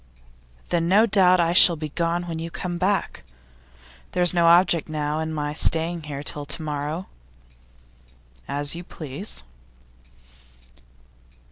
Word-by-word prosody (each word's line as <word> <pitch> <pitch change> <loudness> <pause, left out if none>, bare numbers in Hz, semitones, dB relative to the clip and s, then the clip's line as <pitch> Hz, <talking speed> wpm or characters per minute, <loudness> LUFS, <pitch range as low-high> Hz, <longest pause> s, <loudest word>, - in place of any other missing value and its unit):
'Then 170 -1 0
no 205 +5 +4
doubt 185 -4 +4
I 170 0 +1
shall 175 -1 +7
be 155 -1 -6
gone 170 +3 -2
when 165 -2 -6
you 165 +1 -5
come 175 +1 -5
back. 190 0 -1 0.9
There's 180 -1 +2
no 170 -1 +3
object, 170 -1 +3
now, 150 0 -3
in 160 0 -3
my 150 -1 -3
staying 165 +2 +3
here 145 -2 -7
till 145 0 -4
to 160 - -6
morrow.' 150 +4 -4 1.4
'As 145 +1 +1
you 170 +1 -7
please. 155 - -6
165 Hz, 130 wpm, -23 LUFS, 150-175 Hz, 1.4 s, shall